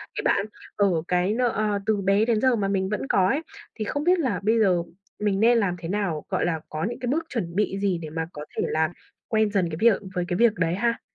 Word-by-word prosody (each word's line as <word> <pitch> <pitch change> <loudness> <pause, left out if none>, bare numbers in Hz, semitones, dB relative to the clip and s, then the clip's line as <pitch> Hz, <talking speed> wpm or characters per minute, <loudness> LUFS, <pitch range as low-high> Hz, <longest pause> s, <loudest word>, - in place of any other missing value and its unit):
cái - - -2
bạn 200 - +2 0.3
ờ, 200 -1 +3 0.2
cái 180 +3 +1
nợ, 250 +2 +2
ơ, 210 -1 0
từ 215 -2 +1
bé 195 +3 +3
đến 225 -2 +1
giờ 260 -2 +4
mà 200 -3 0
mình 190 -1 0
vẫn 215 +5 -3
có 185 -6 +3
ấy 285 +9 +1 0.3
thì 215 - -3
không 285 +7 -2
biết 360 +1 +3
là 245 - 0
bây 225 +2 +3
giờ 180 -5 +3 0.4
mình 205 -2 0
nên 235 +2 +5
làm 200 -6 +1
thế 165 0 -6
nào, 190 -7 -1
gọi - - 0
là, 165 -2 0
có 155 +1 -4
những 240 - -6
cái 245 - -4
bước 320 +4 0
chuẩn 180 -9 -4
bị 195 -1 0
gì 195 -3 +1
để 155 - -6
mà 160 +1 -3
có 150 0 -7
thể - - +1
làm 160 +1 +1 0.4
quen 220 -1 +2
dần 185 -4 +1
cái 155 - -5
việc 230 -3 +4
với 180 -1 0
cái 175 - -1
việc 235 -2 +4
đấy 165 -1 0
ha? 230 +3 0
200 Hz, 265 wpm, -25 LUFS, 180-230 Hz, 0.4 s, nên